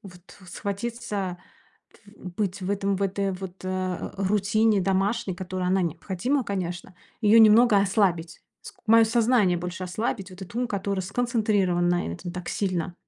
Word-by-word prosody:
вот, 180 - -17
схватиться, 200 -2 -4 0.6
тф - - -23 0.4
быть 200 -2 -2
в 185 - -3
этом 200 -1 0
в 195 - -3
этой 195 0 -1
вот 185 0 -8
э, 185 - -3
а, 185 -1 -3
рутине 205 +2 +2
домашней, 195 +2 0
которая, 185 0 -3
она 190 +1 +2
необходима, 190 - -1
конечно, 185 -2 -4 0.3
ее 215 +2 +6
немного 220 0 +6
ослабить. 185 -5 0 0.2
Ск - - -11
моё 225 +1 +6
сознание 225 -5 +3
больше 180 +1 -5
ослабить, 195 0 -3
вот 185 +1 -12
этот 190 - -10
ум, 245 +1 0
который 200 -1 -2
сконцентрирован 200 -4 +1
на 175 0 +1
этом 175 - -7
так 180 -1 -7
сильно. 185 -3 -2
195 Hz, 155 wpm, -25 LUFS, 180-215 Hz, 0.6 s, ее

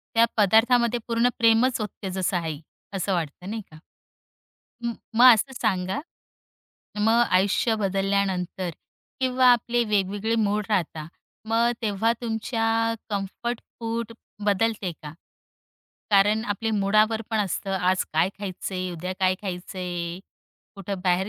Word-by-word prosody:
त्या 230 0 +6
पदार्थामध्ये 235 +3 +4
पूर्ण 230 +1 +3
प्रेमच 230 +2 +4
ओतते 200 -2 -5
जसं 185 0 -1
आई. 160 -3 -3 0.3
असं 195 +1 -1
वाटत 165 0 -4
नाही 220 +1 -3
का? 155 - -14 1.1
म 235 - -1 0.2
मग 245 +2 +9
असं 225 +5 -2
सांगा, 190 -2 0 1.0
मग 225 +3 +4
आयुष्य 200 +5 +2
बदलल्यानंतर. 195 -2 -1 0.5
किंवा 255 0 +3
आपले 240 0 +1
वेगवेगळे 205 +1 0
मूड 210 -1 +1
राहता. 165 -6 -1 0.4
मग 230 +1 +3
तेव्हा 220 +2 +1
तुमच्या 225 0 0 0.2
कम्फर्ट 210 +4 -3 0.2
फूड 230 0 -3 0.3
बदलते 205 -2 +1
का? 150 0 -7 1.0
कारण 210 +3 +4
आपले 220 +1 -2
मुडावर 215 +2 +2
पण 220 - 0
असतं 195 0 -2
आज 185 +1 +2
काय 160 +4 +3
खायचंय, 185 -1 -4
उद्या 180 +2 -4
काय 185 0 +3
खायचंय. 180 -2 -4 0.6
कुठं 195 -1 -5
बाहेर 185 +2 +2
205 Hz, 120 wpm, -25 LUFS, 185-225 Hz, 1.1 s, मग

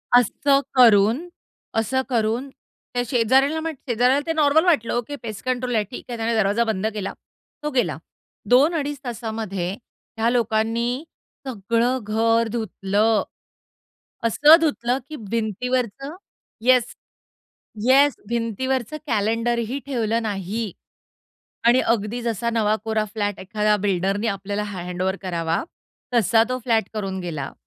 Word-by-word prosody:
असं 275 +4 +4 0.2
करून, 230 - +5 0.5
असं 225 +4 +1
करून 235 +2 0 0.4
त्या 245 - 0
शेजाऱ्याला 265 +6 +3
म 325 - -3 0.2
शेजाऱ्याला 250 +3 +3
ते 325 - +1
नॉर्मल 310 +1 +4
वाटलं, 295 -11 +2
ओके. 240 +4 -2
पेस्ट 220 -7 -8
कंट्रोल 250 -1 -1
आहे 215 - +2
ठीक 245 - -7
आहे 240 - -4
त्याने 225 +1 0
दरवाजा 215 +2 +2
बंद 215 -3 -1
केला. 205 -2 -4 0.5
तो 300 - -1
गेला. 240 - 0 0.5
2 275 +7 +5
अडीच 290 -2 -2
तासामध्ये 220 -6 -4 0.5
ह्या 225 +1 +2
लोकांनी, 235 +2 0 0.4
सगळं 235 +2 0
घर 225 +2 +2
धुतलं. 215 -1 +1 1.0
असं 285 +8 +7
धुतलं 260 -6 0
की 310 - -6
भिंतीवरचं 250 - -2 0.5
येस, 250 -2 +3 0.9
येस 275 +2 +5
भिंतीवरचं 235 +4 -2
कॅलेंडर 230 +1 +1
ही 265 +5 -3
ठेवलं 230 -4 0
नाही. 205 +1 -3 1.0
आणि 245 +2 +6
अगदी 230 +1 0
जसा 235 -1 -1
नवा 215 -2 +1
कोरा 220 -1 +1
फ्लॅट 205 -1 -3
एखाद्या 210 +2 +1
बिल्डरनी 200 +2 0
आपल्याला 200 0 -2
हँडओव्हर 185 -1 -3
करावा 170 -3 -1 0.5
तसा 225 -1 +4
तो 255 - -1
फ्लॅट 225 -2 +2
करून 195 -3 -3
गेला 155 -6 -4
230 Hz, 125 wpm, -23 LUFS, 210-250 Hz, 1.0 s, असं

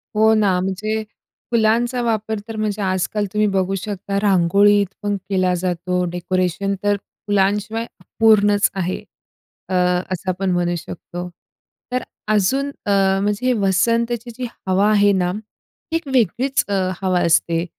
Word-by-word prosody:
हो 220 +1 +5
ना, 200 -4 +2
म्हणजे 215 +4 -2 0.5
फुलांचा 235 +2 +2
वापर 220 -2 -1
तर 225 - -6
म्हणजे 215 -1 -2
आज-काल 190 +2 -1
तुम्ही 210 0 +2
बघू 190 0 0
शकता 200 0 -3
रांगोळीत 200 +1 +4 0.2
पण 205 0 0
केला 185 -2 +2
जातो, 180 0 -1
डेकोरेशन 185 +2 -1
तर 205 0 +3 0.3
फुलांशिवाय 205 +3 +1
अपूर्णच 205 +1 +3
आहे, 185 -1 -2 0.7
अ, - - -3 0.4
असं 185 0 -3
आपण 185 +1 -1
म्हणू 175 -1 0
शकतो. 175 +2 -7 0.6
तर 255 0 -1 0.3
अजून 265 +8 +1 0.2
अ, 205 - 0 0.3
म्हणजे 210 +5 +1
वसंतची 230 +4 +1
जी 255 - -3 0.2
हवा 190 +3 +3
आहे 205 -1 +4
ना, 180 -2 +1 0.6
एक 330 -2 -2
वेगळीच 260 +4 +2
अ, 205 - -2 0.3
हवा 185 -2 +1
असते 165 0 +2
205 Hz, 130 wpm, -20 LUFS, 185-220 Hz, 0.7 s, हो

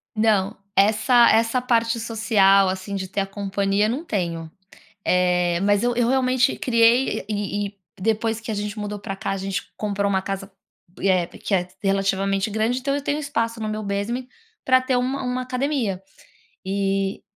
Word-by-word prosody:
Não, 215 -2 +2 0.2
essa 220 +4 +5
essa 225 +3 +2
parte 230 -1 +1
social, 210 -4 +3
assim, 190 +2 -4
de 190 -1 -3
ter 200 +1 -2
a - - -1
companhia, 200 +1 0
não 275 +8 -2
tenho. 165 - -3 0.5
Eh, 180 -1 +2
mas 205 +2 +2
eu 245 -1 +1
eu 240 -1 +2
realmente 260 0 +2
criei, 235 0 +3
e 205 0 -2
e 200 - -15 0.2
depois 225 +1 0
que 225 - -5
a - - -1
gente 205 +1 -4
mudou 210 0 -4
para 195 0 -5
cá, - - -3
a 195 - -1
gente 195 0 -4
comprou 200 -1 -1
uma 190 -1 +1
casa, 195 0 -5 0.5
eh, 185 -3 +2
que 200 - -6
é 180 -1 +2 0.2
relativamente 195 +1 +1
grande, 220 +4 0
então 275 +2 -1
eu 285 - -2
tenho 290 +1 -1
espaço 230 -6 -2
no 215 - -2
meu 215 0 -3
basement, 205 +6 -3 0.4
para 255 0 +5
ter 255 0 0
uma 260 +3 -1
uma 250 0 -2
academia. 250 -7 -1 0.6
E 195 0 -1
210 Hz, 175 wpm, -23 LUFS, 195-235 Hz, 0.6 s, essa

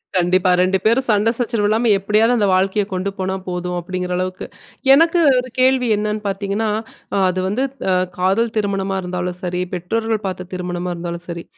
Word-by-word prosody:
கண்டிப்பா 185 +1 +3
ரெண்டு 185 +1 +2
பேரும் 235 +4 +3
சண்ட 210 +1 +3
சச்சரவு 230 -4 0
இல்லாம 225 +2 +2
எப்டியாவது 215 +5 +2
அந்த 210 -3 +2
வாழ்க்கைய 195 +3 +2
கொண்டு 185 +2 -1
போனா 190 0 -2
போதும் 180 0 -3
அப்டிங்கற 180 +1 -4
அளவுக்கு. 185 0 -3 0.5
எனக்கு 330 +4 +4 0.2
ஒரு 255 +1 -5
கேள்வி 255 -1 +3
என்னன்னு 210 +1 -2
பாத்தீங்கன்னா, 200 +2 -1 0.5
அ - - +2
அது 185 0 -2
வந்து 215 +7 0 0.3
அ - - +3 0.2
காதல் 205 +5 +1
திருமணமா 195 -2 -1
இருந்தாலும் 180 0 -3
சரி, 180 0 -2
பெற்றோர்கள் 220 +4 -2
பார்த்த 185 -1 -5
திருமணமா 180 0 -3
இருந்தாலும் 170 0 -5
சரி, 170 0 -5
195 Hz, 165 wpm, -19 LUFS, 180-220 Hz, 0.5 s, எனக்கு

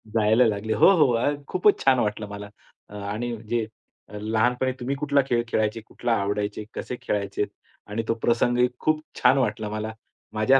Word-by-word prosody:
जायला 110 +3 +4
लागले. 110 +1 -1
हो, - - +6
हो. 125 -6 +4 0.3
खूपच 190 +3 +3
छान 130 -2 +5
वाटलं 105 -1 -1
मला. 105 0 -7 0.6
आणि 120 +2 -3
जे 115 -2 0 0.5
लहानपणी 115 +5 0
तुम्ही 135 +3 -2
कुठला 140 0 +2
खेळ 120 -2 +2
खेळायचे, 110 0 0
कुठला 120 -1 -2
आवडायचे, 105 +1 -2
कसे 125 - -5
खेळायचे 100 0 -1 0.4
आणि 110 +2 -3
तो - - +2
प्रसंगही 120 +1 +3
खूप 155 0 +1 0.2
छान 130 +2 +5
वाटला 110 -4 0
मला. 110 +1 -4 0.4
माझ्या 130 +5 +4
115 Hz, 155 wpm, -25 LUFS, 105-125 Hz, 0.6 s, हो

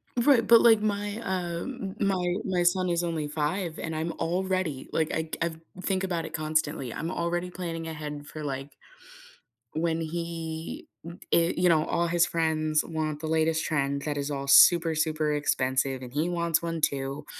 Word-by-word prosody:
Right, 240 0 +4
but, 230 -1 +7
like, 225 -2 +6
my, 205 0 -1
uh, 175 -4 -2 0.3
my 180 -3 +1
my 185 -2 +1
son 180 +1 +2
is 170 0 +1
only 165 -3 -2
5 155 +3 -2
and 160 0 -4
I'm 160 +2 -2
already, 185 -4 -1
like, 160 -1 +1
I 160 0 -1
I 170 - +2 0.3
think 190 0 -1
about 175 -3 -1
it 155 - -9
constantly, 155 -4 -1
I'm 165 - -4
already 175 0 -2
planning 165 -2 -5
ahead 150 -2 -6
for, 155 - -7
like, 135 0 -5 1.0
when 165 0 0
he, 165 0 -5 0.2
uh, - - -5 0.2
i 170 0 +4
you 180 0 +3
know, 160 -2 +4
all 170 0 0
his 170 0 +3
friends 155 -2 +1
want 155 -2 -3
the 160 - -4
latest 160 0 +1
trend 140 -2 0
that 150 -1 -2
is 140 +1 -2
all 140 -1 -3
super, 165 +3 +7
super 155 -1 0
expensive, 130 -2 0
and 125 -1 -8
he 155 +4 0
wants 170 -2 0
one 165 -1 -3
too, 140 0 -1
165 Hz, 175 wpm, -27 LUFS, 155-175 Hz, 1.0 s, but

